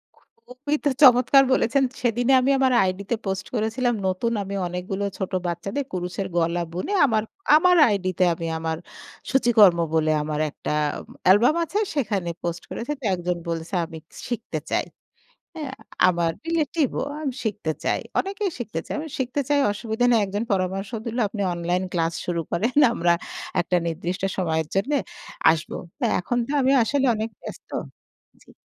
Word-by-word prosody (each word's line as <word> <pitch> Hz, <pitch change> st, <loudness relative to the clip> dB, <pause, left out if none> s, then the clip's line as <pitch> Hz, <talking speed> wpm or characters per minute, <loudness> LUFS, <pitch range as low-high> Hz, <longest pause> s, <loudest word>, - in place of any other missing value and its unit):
খু -, -, -28 dB, 0.3 s
খুবই 280 Hz, +4 st, -2 dB
তো -, -, +5 dB
চমৎকার 255 Hz, +1 st, +7 dB
বলেছেন। 260 Hz, +2 st, +2 dB, 0.2 s
সেদিনই 245 Hz, +2 st, +2 dB
আমি 265 Hz, +2 st, +2 dB
আমার 260 Hz, -1 st, +3 dB
আইডিতে 190 Hz, +4 st, -1 dB
পোস্ট 190 Hz, -1 st, -2 dB
করেছিলাম। 235 Hz, +3 st, 0 dB
নতুন 190 Hz, +5 st, 0 dB
আমি 200 Hz, +1 st, -5 dB
অনেকগুলো 180 Hz, +3 st, -4 dB
ছোট 190 Hz, -, -3 dB, 0.2 s
বাচ্চাদের 195 Hz, -, -3 dB
কুরুশের 180 Hz, +1 st, -3 dB
গলা 170 Hz, +1 st, +1 dB
বুনে 185 Hz, -, -3 dB
আমার 220 Hz, -5 st, +1 dB, 0.3 s
আমার 360 Hz, +3 st, +5 dB
আইডিতে 185 Hz, -3 st, 0 dB
আমি 165 Hz, 0 st, -5 dB
আমার 160 Hz, 0 st, -2 dB, 0.5 s
সূচিকর্ম 225 Hz, -9 st, +5 dB
বলে 155 Hz, -1 st, +2 dB
আমার 150 Hz, 0 st, -3 dB
একটা 145 Hz, -, -6 dB, 0.5 s
অ্যালবাম 210 Hz, -, +5 dB
আছে। 390 Hz, +5 st, -2 dB, 0.2 s
সেখানে 205 Hz, -, -1 dB
পোস্ট 170 Hz, 0 st, -3 dB
করেছে। 240 Hz, +6 st, -4 dB
তা 265 Hz, -, -8 dB
একজন 175 Hz, 0 st, -2 dB
বলছে 165 Hz, +2 st, -4 dB
আমি 165 Hz, -1 st, -9 dB, 0.3 s
শিখতে 240 Hz, -2 st, -3 dB
চাই। -, -, +1 dB, 0.7 s
হ্যাঁ? 295 Hz, -5 st, -5 dB, 0.3 s
আমার 170 Hz, -2 st, +2 dB
রিলেটিভ 320 Hz, -2 st, +1 dB
ও -, -, 0 dB, 0.2 s
আমি 275 Hz, -4 st, -2 dB
শিখতে 210 Hz, -7 st, -2 dB
চাই। -, -, +1 dB, 0.2 s
অনেকেই 395 Hz, +1 st, -2 dB
শিখতে 210 Hz, -9 st, -4 dB
চায়। -, -, -4 dB
আমি 315 Hz, +1 st, -6 dB
শিখতে 260 Hz, +2 st, -1 dB
চাই 290 Hz, -1 st, +3 dB
অসুবিধা 220 Hz, +3 st, -1 dB
নেই। 230 Hz, -, +5 dB
একজন 205 Hz, +3 st, -3 dB
পরামর্শ 195 Hz, +1 st, -1 dB, 0.2 s
দিল 230 Hz, +1 st, -4 dB
"আপনি 205 Hz, 0 st, -5 dB
অনলাইন 175 Hz, +2 st, -1 dB
ক্লাস 165 Hz, -1 st, 0 dB
শুরু 170 Hz, -1 st, -1 dB
করেন। 230 Hz, +8 st, 0 dB, 0.2 s
আমরা 170 Hz, -3 st, +2 dB, 0.5 s
একটা 180 Hz, +1 st, 0 dB
নির্দিষ্ট 170 Hz, +3 st, -3 dB, 0.2 s
সময়ের 160 Hz, -4 st, 0 dB
জন্যে 280 Hz, +9 st, +1 dB, 0.5 s
আসব।" 160 Hz, 0 st, -3 dB, 0.5 s
এখন 240 Hz, +7 st, -2 dB
তো -, -, -4 dB
আমি 260 Hz, -, +3 dB
আসলে 275 Hz, +3 st, +1 dB
অনেক 220 Hz, +1 st, -3 dB
ব্যস্ত -, -, -10 dB, 0.7 s
জি। -, -, -19 dB
205 Hz, 155 wpm, -24 LUFS, 175-255 Hz, 0.7 s, চমৎকার